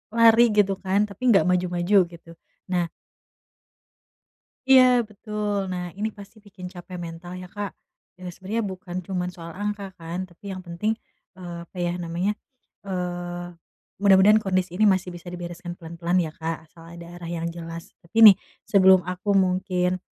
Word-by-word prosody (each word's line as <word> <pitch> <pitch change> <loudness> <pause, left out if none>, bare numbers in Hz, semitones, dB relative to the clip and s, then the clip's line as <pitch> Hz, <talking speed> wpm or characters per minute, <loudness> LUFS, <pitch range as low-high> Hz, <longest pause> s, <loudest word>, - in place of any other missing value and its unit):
lari 230 0 +7 0.2
gitu, 200 -1 +4
kan, 190 +1 +1
tapi 200 +3 -14
nggak 195 - +5
maju-maju, 180 +2 +1 0.2
gitu. 170 0 -14 0.4
Nah 175 -2 +1 1.8
Iya, 255 -3 +7
betul. 210 -2 -3
Nah, 180 -1 -4
ini 210 +3 -2
pasti 205 +1 -14
bikin 195 -3 -11
capek 180 0 -9
mental, 175 +1 -7
ya, 180 - -8
Kak. 205 +2 -5 0.5
Eee, 180 -1 -7
sebenernya 210 +4 -3
bukan 185 -2 -6
cuma 180 -2 -2
soal 170 -2 -10
angka, 205 -1 -4
kan, 170 +2 -5
tapi 185 +3 -12
yang 185 -1 -7
penting, 210 +6 -2 0.4
eee, 175 -2 -7
apa, 185 - -15
ya, 175 0 0
namanya, 175 +5 -1 0.5
eee, 175 -2 -4 0.5
mudah-mudahan 200 +2 +6
kondisi 185 -3 -1
ini 210 +3 +4
masih 185 -1 0
bisa 175 0 -9
dibereskan 175 0 -7
pelan-pelan, 170 +2 -2
ya, 160 -3 0
Kak, 165 0 -5
asal 165 +1 -18 0.2
ada 170 0 -10
arah 175 -1 -8
yang 170 -1 -3
jelas. 165 0 -8
Tapi, 220 +7 +5
nih, 205 -3 +11 0.3
sebelum 190 -3 +5
aku 185 +2 0
mungkin, 185 -1 +1
185 Hz, 155 wpm, -24 LUFS, 175-200 Hz, 1.8 s, nih